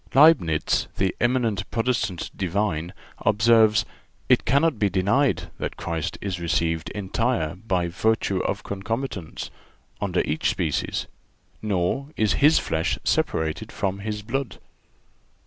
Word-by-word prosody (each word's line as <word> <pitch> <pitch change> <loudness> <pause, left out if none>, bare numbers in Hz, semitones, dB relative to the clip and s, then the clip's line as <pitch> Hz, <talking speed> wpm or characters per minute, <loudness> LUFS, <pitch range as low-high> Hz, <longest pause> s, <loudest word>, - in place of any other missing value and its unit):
(381) 155 +5 +8
Leibnitz, 80 -1 0
the 95 -1 0
eminent 120 -5 +1
Protestant 115 -5 -1
divine, 90 -3 -1 0.3
observes: 110 -1 +4 0.4
"It - - +4
cannot 140 +1 +2
be 105 - +3
denied 100 +9 +1
that - - -4
Christ 80 -2 -3
is 95 -3 -3
received 80 -1 0
entire 105 -4 -1
by 90 -2 -1
virtue 100 +1 0
of - - -2
concomitance, 100 - -4 0.5
under - - +1
each 75 - 0
species; - - -1 0.6
nor 105 +6 0
is 110 -1 +2
His 150 +3 +6
flesh 80 +1 0
separated 80 -1 0
from 95 0 -2
His 105 0 -4
blood." 120 0 -3
100 Hz, 120 wpm, -24 LUFS, 90-115 Hz, 0.6 s, 381